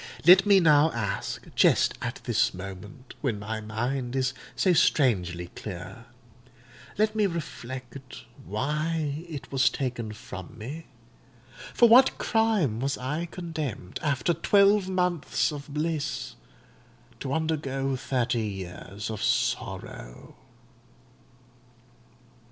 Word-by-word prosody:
Let 185 Hz, +4 st, +8 dB
me 200 Hz, -1 st, +7 dB
now 155 Hz, -2 st, +5 dB
ask, 110 Hz, -4 st, -3 dB
just -, -, +4 dB
at -, -, -4 dB
this -, -, +1 dB
moment, 95 Hz, +7 st, -9 dB
when 125 Hz, -7 st, -1 dB
my 110 Hz, +2 st, -4 dB
mind 120 Hz, +4 st, -3 dB
is 130 Hz, -1 st, +1 dB, 0.2 s
so 185 Hz, -, +3 dB
strangely 90 Hz, -, +2 dB
clear,—let 120 Hz, -, -7 dB
me 210 Hz, -2 st, +3 dB
reflect 130 Hz, -6 st, -7 dB, 0.2 s
why 150 Hz, -, -2 dB
it 140 Hz, -4 st, -7 dB
was 130 Hz, -2 st, +4 dB
taken 120 Hz, -4 st, -3 dB
from 95 Hz, -2 st, -9 dB
me? 140 Hz, +9 st, -7 dB, 0.9 s
For 235 Hz, -, +7 dB
what 250 Hz, +4 st, +6 dB
crime 215 Hz, -, +1 dB
was 135 Hz, +2 st, -1 dB
I 150 Hz, +7 st, -3 dB
condemned, 155 Hz, -, -5 dB
after 150 Hz, +1 st, +1 dB
twelve 200 Hz, +3 st, +4 dB
months 180 Hz, -6 st, 0 dB
of 145 Hz, -1 st, -7 dB
bliss, 150 Hz, -3 st, -2 dB, 0.9 s
to 130 Hz, -, -4 dB
undergo 140 Hz, -4 st, -1 dB
thirty 125 Hz, -1 st, -1 dB
years 100 Hz, 0 st, -6 dB
of 110 Hz, -, -5 dB
sorrow? -, -, -2 dB
135 Hz, 105 wpm, -27 LUFS, 110-160 Hz, 0.9 s, Let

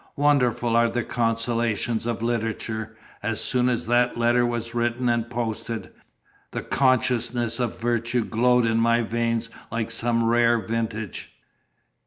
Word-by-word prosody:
Wonderful 125 Hz, -5 st, +2 dB
are 115 Hz, 0 st, +4 dB
the 120 Hz, +1 st, -1 dB
consolations 115 Hz, -1 st, -1 dB
of 115 Hz, -1 st, -2 dB
literature! 110 Hz, -1 st, -3 dB, 0.2 s
As 115 Hz, 0 st, -2 dB
soon 125 Hz, -1 st, +1 dB
as 120 Hz, -2 st, -1 dB
that 120 Hz, +1 st, +2 dB
letter 120 Hz, +1 st, +3 dB
was 115 Hz, -1 st, -3 dB
written 120 Hz, +1 st, 0 dB
and 120 Hz, -1 st, +1 dB
posted, 115 Hz, -1 st, -4 dB, 0.6 s
the -, -, -5 dB
consciousness 120 Hz, -3 st, +1 dB
of 120 Hz, -2 st, -2 dB
virtue 120 Hz, 0 st, 0 dB
glowed 125 Hz, +1 st, +3 dB
in 115 Hz, 0 st, +2 dB
my 115 Hz, +1 st, +3 dB
veins 115 Hz, 0 st, -1 dB, 0.2 s
like 115 Hz, 0 st, -2 dB
some 115 Hz, 0 st, 0 dB
rare 120 Hz, +1 st, +4 dB
vintage. 110 Hz, -2 st, -4 dB
115 Hz, 135 wpm, -24 LUFS, 115-120 Hz, 0.6 s, are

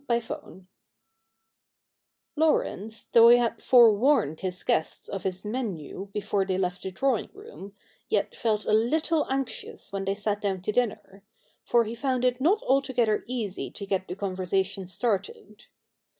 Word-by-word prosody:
CHAPTER 235 Hz, -1 st, -1 dB
III 185 Hz, +2 st, -15 dB, 1.7 s
Laurence, 225 Hz, -, 0 dB
though 230 Hz, 0 st, +8 dB
he 240 Hz, -, +8 dB
had 235 Hz, -1 st, -1 dB
forewarned 230 Hz, -, +4 dB
his 185 Hz, -1 st, -4 dB
guests 160 Hz, -, -1 dB
of 195 Hz, -, -5 dB
his 185 Hz, -1 st, -4 dB
me7iu 200 Hz, -, -5 dB
before 205 Hz, -1 st, -1 dB
they 190 Hz, -1 st, -1 dB
left 180 Hz, -1 st, -2 dB
the 190 Hz, -, -4 dB
drawing 255 Hz, +4 st, 0 dB
room, 400 Hz, -, -11 dB, 0.3 s
yet -, -, 0 dB
felt 215 Hz, -3 st, -1 dB
a -, -, +1 dB
little 305 Hz, +8 st, +2 dB
anxious 270 Hz, -6 st, -4 dB
when 195 Hz, -1 st, -3 dB
they 195 Hz, +1 st, 0 dB
sat 205 Hz, 0 st, -2 dB
down 190 Hz, -3 st, -2 dB
to 215 Hz, -, -1 dB
dinner; 210 Hz, -4 st, -2 dB, 0.4 s
for 235 Hz, -1 st, +3 dB
he 225 Hz, +1 st, -5 dB
found 255 Hz, 0 st, -1 dB
it 250 Hz, +1 st, +1 dB
not 380 Hz, +9 st, +3 dB
altogether 250 Hz, -5 st, +1 dB
easy 230 Hz, -6 st, -4 dB
to 200 Hz, -, -8 dB
get 190 Hz, -1 st, -2 dB
the 180 Hz, -, -5 dB
conversation 190 Hz, 0 st, -2 dB
started. 200 Hz, +1 st, -3 dB
210 Hz, 150 wpm, -27 LUFS, 195-245 Hz, 1.7 s, though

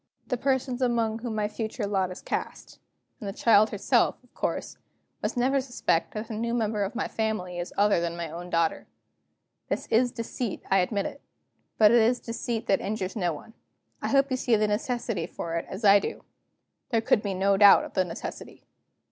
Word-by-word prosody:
The 250 Hz, -, -1 dB
persons 260 Hz, 0 st, -1 dB
among 230 Hz, -3 st, +1 dB
whom 230 Hz, -2 st, -4 dB
my 210 Hz, -1 st, 0 dB
future 220 Hz, +1 st, -4 dB
lot 195 Hz, -2 st, 0 dB
is 180 Hz, -, -9 dB
cast -, -, -5 dB, 0.4 s
and 205 Hz, -, -5 dB
the -, -, -3 dB
child 215 Hz, 0 st, +4 dB
herself, 205 Hz, -, +2 dB
of -, -, -27 dB
course -, -, -3 dB, 0.4 s
must -, -, -2 dB
never 265 Hz, +3 st, +2 dB
suspect 245 Hz, -10 st, -1 dB
that 215 Hz, +1 st, -4 dB
the 225 Hz, -, -6 dB
new 235 Hz, +2 st, -2 dB
member 215 Hz, -2 st, 0 dB
of 200 Hz, +4 st, -2 dB
my 250 Hz, -, -1 dB
family 215 Hz, -5 st, -2 dB
is 175 Hz, -, -4 dB
other 205 Hz, -3 st, +3 dB
than 170 Hz, 0 st, -3 dB
my 170 Hz, -1 st, -3 dB
own 170 Hz, +3 st, -8 dB
daughter. 165 Hz, -1 st, 0 dB, 0.8 s
This -, -, -2 dB
is 240 Hz, +2 st, +3 dB
deceit, 230 Hz, -1 st, -4 dB
I 195 Hz, -, +5 dB
admit; 200 Hz, +8 st, -2 dB, 0.6 s
but 215 Hz, -1 st, +7 dB
it 235 Hz, 0 st, +6 dB
is 240 Hz, +3 st, +3 dB
deceit 230 Hz, 0 st, -4 dB
that 195 Hz, -, +2 dB
injures 200 Hz, -1 st, -3 dB
no 180 Hz, -5 st, 0 dB
one. 160 Hz, +9 st, -10 dB, 0.5 s
I -, -, -2 dB
hope 275 Hz, 0 st, +3 dB
you 255 Hz, -, +1 dB
see 245 Hz, -2 st, +2 dB
the 215 Hz, 0 st, +2 dB
necessity 215 Hz, -3 st, -2 dB
for 165 Hz, -, -6 dB
it, 170 Hz, -, -3 dB
as 195 Hz, +4 st, -5 dB
I 200 Hz, 0 st, +8 dB
do." -, -, -5 dB, 0.7 s
There 230 Hz, -3 st, +2 dB
could 215 Hz, -, +3 dB
be 200 Hz, -3 st, -3 dB
no 195 Hz, +1 st, +3 dB
doubt 200 Hz, 0 st, +7 dB
of -, -, -11 dB
the 185 Hz, -, +2 dB
necessity. 170 Hz, -2 st, -8 dB
215 Hz, 200 wpm, -27 LUFS, 195-235 Hz, 0.8 s, I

